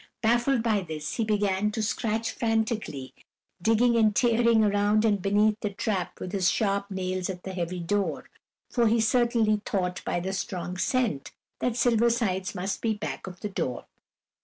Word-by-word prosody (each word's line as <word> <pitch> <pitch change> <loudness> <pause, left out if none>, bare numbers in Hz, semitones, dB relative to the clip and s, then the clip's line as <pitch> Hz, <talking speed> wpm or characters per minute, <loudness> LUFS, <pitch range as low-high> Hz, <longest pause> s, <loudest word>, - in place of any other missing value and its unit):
Baffled 240 +2 +2
by 215 -3 +2
this, 155 -4 -5
he 230 - +1
began 205 -1 +1
to 220 - -1
scratch 225 0 -1
frantically, 220 - -2 0.5
digging 230 +4 +3
and 215 -2 +3
tearing 235 -2 +4
around 205 +1 +2
and 205 -3 +2
beneath 210 +2 +2
the 210 - -1
trap 195 -2 -3
with 185 - -5
his 190 -2 +2
sharp 200 -2 0
nails 185 -1 -2
at 180 -2 -6
the 190 - -6
heavy 180 0 -3
door, 195 +4 -1 0.4
for 235 -2 +2
he 230 +1 +3
certainly 225 -2 +2
thought, 180 -3 -2
by - - -1
the 190 +2 -3
strong 180 -2 -4
scent, 210 - -1 0.3
that 245 -2 0
Silver 235 -1 +3
Sides 195 -6 -1
must 190 +2 -3
be 225 -2 0
back 205 - -5
of 180 -1 -9
the 210 - -3
door. 130 -10 -3
210 Hz, 170 wpm, -27 LUFS, 185-225 Hz, 0.5 s, tearing